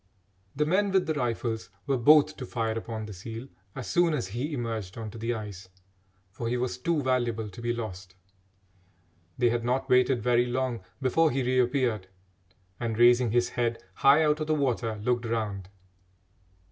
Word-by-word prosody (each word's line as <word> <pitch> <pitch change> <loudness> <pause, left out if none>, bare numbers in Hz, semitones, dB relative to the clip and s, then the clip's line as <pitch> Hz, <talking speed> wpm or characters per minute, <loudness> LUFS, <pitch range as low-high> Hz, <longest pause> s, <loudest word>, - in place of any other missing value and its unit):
The 150 +2 +1
men 195 +6 +2
with 190 -1 +3
the 160 - 0
rifles 115 -6 -2 0.2
were 135 - +1
both 150 +4 +5
to 130 - -5
fire 115 -2 -2
upon 115 -1 -5
the 105 - -8
seal 115 +7 -8 0.3
as 130 - -5
soon 175 -3 +2
as 95 - -3
he 125 +9 -3
emerged 115 -8 -4
on 110 -2 -5
to 115 - -10
the 115 +2 -1
ice, 100 -4 -8 0.6
for 115 +4 -5
he 125 - 0
was 125 0 -2
too 155 +2 0
valuable 120 -4 0
to 115 - -10
be 120 0 0
lost. 95 -6 -6 1.2
They 120 -1 +3
had 120 0 -1
not 130 +3 -1
waited 125 -2 +4
very 120 0 +3
long 125 -3 -2 0.2
before 160 +5 +3
he 135 -1 -1
reappeared 125 -4 +1 0.7
and, 115 -2 -2
raising 120 0 +5
his 120 +2 +2
head 120 -1 -2
high 140 +9 +5
out 150 0 +2
of 155 - -3
the 155 - +2
water, 125 -6 0
looked 120 0 0
around. 105 -5 -3
120 Hz, 175 wpm, -28 LUFS, 115-135 Hz, 1.2 s, both